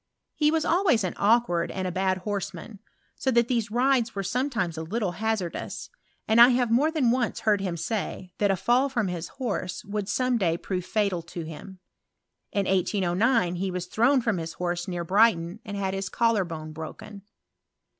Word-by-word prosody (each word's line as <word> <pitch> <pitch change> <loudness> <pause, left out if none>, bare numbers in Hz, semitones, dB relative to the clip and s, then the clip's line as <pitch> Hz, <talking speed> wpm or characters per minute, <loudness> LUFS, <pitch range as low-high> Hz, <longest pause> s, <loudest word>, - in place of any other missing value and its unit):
He 300 -1 +2
was 320 0 +1
always 340 - +3
an 185 - -2
awkward 205 -6 +2
and 185 -1 -3
a - - -2
bad 185 +1 0
horseman, 200 +1 -5 0.4
so 265 - -1
that 235 -2 +3
these 230 -4 0
rides 245 0 +2
were 195 - -2
sometimes 230 - -1
a 160 - -4
little 190 +3 -2
ha^rdous; 215 -2 -3 0.4
and 220 +2 +5
I 240 - +10
have 245 -2 +1
more 275 +7 +4
than 295 -7 +2
once 245 -2 -1
heard 210 -2 +3
htm 185 -3 -3
say, 185 0 -4
that 205 - +3
a 195 - +3
fall 245 +9 +2
front 235 -8 -1
his 170 -1 -4
horse 225 -6 -4
would 205 0 -3
some 250 +2 +1
dm 170 -3 0
prove 180 -2 -3
fatal 200 -4 0
to 170 0 -7
him. 180 +4 -10 0.7
In 200 -1 0
1809 185 +2 +1
he 190 +2 -1
was 180 -1 -3
thrown 245 +8 +3
from 225 -6 0
hu 165 - -3
horse 175 -1 -2
near 175 -2 -3
Brighton, 185 -1 +3
and 205 -4 -6
had 190 -1 -1
his 195 0 -3
collar 230 -4 +2
bone 155 -2 -7
broken. 160 +6 -8
200 Hz, 185 wpm, -26 LUFS, 180-235 Hz, 0.7 s, I